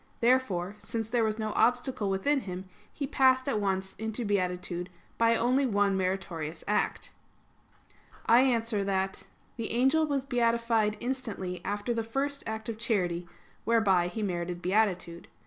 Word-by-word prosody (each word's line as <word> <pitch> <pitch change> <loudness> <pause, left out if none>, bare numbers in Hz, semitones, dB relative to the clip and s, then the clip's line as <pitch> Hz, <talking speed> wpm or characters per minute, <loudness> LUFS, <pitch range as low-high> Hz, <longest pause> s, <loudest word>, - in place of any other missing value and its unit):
Therefore, 230 -7 +2
since 225 +2 -4
there 240 -2 +2
was 215 -1 0
no 215 -1 -2
obstacle 245 -3 +1
within 270 +10 +1
him, 185 -5 -6 0.3
he 285 - -4
passed 260 -1 +3
at 260 -6 +1
once 190 -1 -1
into 220 +2 -3
beatitude 180 -2 -1 0.3
by 230 0 +4
only 250 +4 +2
one 205 -3 +2
meritorious 185 -4 -3
act. 210 - 0 1.1
I 235 - +6
answer 230 -5 +1
that, 190 -1 -1 0.3
The 230 -2 -3
angel 270 +7 +3
was 275 -2 -1
beatified 230 -4 +1
instantly 230 -8 -4
after 205 +3 -2
the 230 - -1
first 275 +5 -2
act 220 0 -4
of 225 -2 -4
charity, 180 -7 0 0.4
whereby 200 -6 +3
he 215 +5 -4
merited 175 -2 -2
beatitude. 180 -3 0
220 Hz, 145 wpm, -29 LUFS, 190-240 Hz, 1.1 s, I